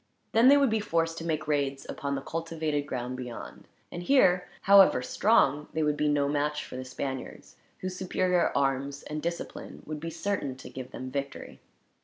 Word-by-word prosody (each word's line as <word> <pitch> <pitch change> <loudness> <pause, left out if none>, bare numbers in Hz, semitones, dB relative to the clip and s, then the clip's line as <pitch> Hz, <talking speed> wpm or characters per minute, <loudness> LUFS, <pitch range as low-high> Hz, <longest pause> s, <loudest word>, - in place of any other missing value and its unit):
Then 230 +3 +5
they 285 +2 +8
would 275 -4 +3
be 220 - +2
forced 165 -5 0
to - - -6
make 155 -2 -2
raids 140 -2 0
upon 140 0 -3
the 135 - -4
cultivated 160 -3 -2
ground 125 -1 -4
beyond; 125 -2 -8 0.2
and 175 - -5
here, 180 -5 +4
however 195 -10 +6
strong, 150 - +3
they 160 - 0
would 150 -1 +2
be 150 0 0
no 145 -1 +2
match 150 +1 -1
for - - -9
the 130 - -4
Spaniards, 130 0 -6 0.3
whose 185 0 -4
superior 180 -1 +1
arms 140 0 0
and 150 0 -5
discipline 170 +1 -5
would 155 0 -5
be 165 +2 -5
certain 165 -5 -2
to 130 - -11
give 130 -1 -7
them 130 0 -7
victory. 140 0 -5
150 Hz, 185 wpm, -28 LUFS, 140-175 Hz, 0.3 s, they